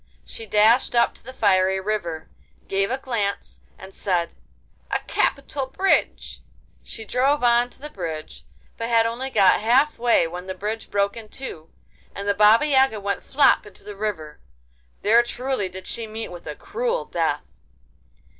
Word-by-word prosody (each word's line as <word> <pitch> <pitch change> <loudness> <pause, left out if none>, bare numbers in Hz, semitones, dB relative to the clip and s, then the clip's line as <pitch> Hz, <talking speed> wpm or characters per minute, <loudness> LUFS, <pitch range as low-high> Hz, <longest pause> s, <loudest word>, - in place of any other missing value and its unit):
She 225 - -9
dashed 220 +5 +4
up 235 0 +3
to - - -17
the 260 - -9
fiery 190 -5 +2
river, 175 -6 -3 0.4
gave 195 0 0
a 260 - -1
glance, 230 -7 -3 0.2
and 190 +1 -12
said, 175 -4 -1 0.6
'A - - +1
capital 275 -1 -1
bridge!' 385 +8 0 0.4
She 220 - -9
drove 265 +5 +1
on 240 0 +4
to - - -17
the 295 - -7
bridge, 160 -4 -6 0.3
but 230 0 -4
had 230 -1 +4
only 240 +4 -3
got 200 -6 +4
half 260 +7 +3
way 235 -7 +3
when 180 +3 -7
the 190 - -4
bridge 215 +4 -5
broke 200 0 0
in 225 -2 -10
two, 165 -13 -9 0.5
and 200 0 -5
the 200 - +3
Baba 210 +6 +5
Yaga 265 -6 +3
went 200 0 -3
flop 275 -6 +3
into 200 - -16
the 210 - -9
river. 195 -8 -4 0.6
There 230 +3 +6
truly 240 -4 -3
did 185 +1 -9
she 230 -1 -6
meet 220 +1 -6
with 175 -2 -11
a 150 - -5
cruel 485 +2 -2
death! - - -1
215 Hz, 165 wpm, -23 LUFS, 190-245 Hz, 0.6 s, There